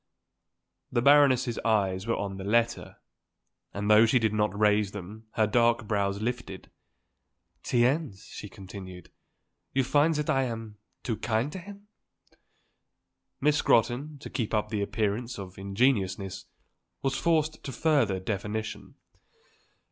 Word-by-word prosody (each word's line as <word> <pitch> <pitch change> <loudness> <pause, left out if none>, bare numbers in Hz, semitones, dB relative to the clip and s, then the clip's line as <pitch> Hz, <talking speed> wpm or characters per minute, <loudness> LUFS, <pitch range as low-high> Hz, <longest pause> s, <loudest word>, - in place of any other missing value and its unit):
The 120 - +1
Baroness's 135 -4 +5
eyes 100 -3 0
were 115 - +1
on 100 -1 -4
her - - -5
letter, 115 +3 0 0.7
and 100 +1 -4
though 110 +2 +7
she 120 - +4
did 110 -3 +1
not 105 -2 0
raise 105 -1 +3
them 105 +3 -9
her 110 - +3
dark 115 +1 +2
brows 100 -2 0
lifted. 125 +1 -5 0.9
"Tiens," 120 -4 0
she 105 - -8
continued, 95 -2 -10 0.6
"you 135 - +3
find 150 +5 +3
that 150 0 -1
I 135 -1 +2
am 115 -3 -6 0.2
too 115 -3 -2
kind 115 +5 -1
to 190 - -6
him?" 200 +3 -12 1.5
Miss 150 +1 +3
Scrotton, 125 +7 +2
to - - -8
keep 115 -4 -2
up 105 0 0
the 105 -2 -2
appearance 105 +4 -2
of 95 -1 -9
ingenuousness, 95 -3 0 0.6
was 135 -1 0
forced 155 -1 0
to 135 - -5
further 130 -11 +2
definition. 105 +3 -4
110 Hz, 135 wpm, -28 LUFS, 100-130 Hz, 1.5 s, though